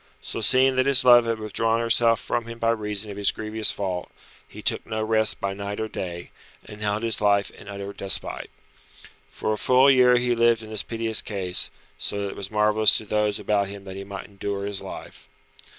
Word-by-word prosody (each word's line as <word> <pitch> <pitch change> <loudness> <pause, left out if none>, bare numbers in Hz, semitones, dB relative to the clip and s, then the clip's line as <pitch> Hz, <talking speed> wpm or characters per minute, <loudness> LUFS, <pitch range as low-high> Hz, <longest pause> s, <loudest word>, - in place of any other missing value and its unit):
So - - -5
seeing 130 +4 +3
that 130 +1 +2
his 135 -2 +4
love 120 -1 +7
had 115 -1 0
withdrawn 110 +1 0
herself 115 0 +3
from 115 -1 -3
him 115 0 -8
by 115 0 +1
reason 105 -2 -3
of 100 - -9
his 100 - +2
grievous 110 0 -1
fault, 95 -3 -4 0.4
he - - -12
took - - +1
no 110 0 -2
rest 110 0 +1
by 100 0 -2
night 100 +1 -5
or 110 - -2
day, 85 -4 -6 0.3
and 105 0 -11
held 105 +1 -1
his 115 -2 +1
life 100 -1 +2
in - - -15
utter 100 0 -7
despite. 100 -1 -2 0.8
For 110 - -2
a - - -3
full 130 +2 +5
year 125 -1 +5
he 120 0 +1
lived 115 -1 +2
in 110 - -10
this 110 - +1
piteous 115 -1 -1
case, 95 -4 -1 0.3
so 100 - -2
that 100 - -3
it - - -8
was 100 -1 -5
marvellous 105 0 +4
to 110 - -4
those 105 -1 0
about 100 -1 0
him 100 0 -8
that 95 -1 -9
he 100 - -6
might 100 0 -8
endure 100 0 -5
his 100 -1 -3
life. 65 - -10
105 Hz, 215 wpm, -24 LUFS, 100-115 Hz, 0.8 s, love